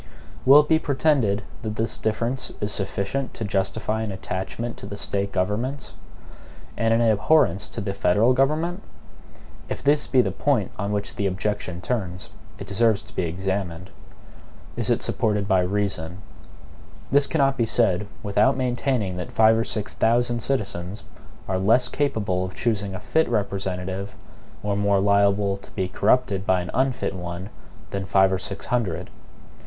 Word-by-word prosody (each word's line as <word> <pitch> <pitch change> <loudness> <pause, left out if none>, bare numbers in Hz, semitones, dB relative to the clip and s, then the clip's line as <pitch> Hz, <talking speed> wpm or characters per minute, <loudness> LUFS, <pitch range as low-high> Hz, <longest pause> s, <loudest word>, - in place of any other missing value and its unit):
Will 140 +3 +10
it 150 - -6
be 160 0 +4
pretended 130 -8 +1 0.2
that 110 -2 -4
this 115 +1 0
difference 120 +4 -2
is 105 0 -1
sufficient 100 +7 -2
to - - -4
justify 105 +3 -1
an 110 -2 -3
attachment 95 +5 -4
to - - -8
the 100 - -6
State 100 0 -2
governments, 105 +9 -2 0.8
and 115 0 +1
an 115 +1 +3
abhorrence 110 -1 +3
to 115 - -6
the 100 -1 -3
federal 100 +6 +3
government? 155 +8 +1 0.9
If - - -4
this 145 +2 +3
be 130 -2 +4
the - - -1
point 130 -9 0
on 100 0 -1
which 105 -1 -2
the 100 - +1
objection 95 -2 -3
turns, 95 -6 -3 0.3
it - - -7
deserves 110 0 +2
to - - -17
be 90 - 0
examined. 95 +1 -3 0.8
Is - - -2
it - - +2
supported 105 -2 0
by 95 -2 +4
REASON? 90 -3 -2 0.9
This 140 +1 +4
cannot 135 -4 +2
be 115 -3 0
said, 105 -4 +2 0.2
without 115 +6 +3
maintaining 125 -6 -1
that 90 - -5
five 110 0 +5
or 115 - +1
six 105 -2 -3
thousand 120 +1 +2
citizens 100 -7 -2 0.4
are 95 -1 0
less 115 +6 +4
capable 105 -12 -1
of 95 0 -6
choosing 105 -4 -1
a - - -5
fit 160 0 +1
representative, 95 -1 -2 0.5
or 105 -1 0
more 100 -1 +2
liable 100 0 +3
to - - -14
be 95 -3 -2
corrupted 100 -1 +1
by 95 -1 +3
an 90 - -6
unfit 130 -6 0
one, 90 +2 -6 0.4
than 95 -1 -3
five 95 0 +4
or 95 - 0
six 100 +1 -6
hundred. 115 -9 -2
105 Hz, 160 wpm, -24 LUFS, 95-120 Hz, 0.9 s, Will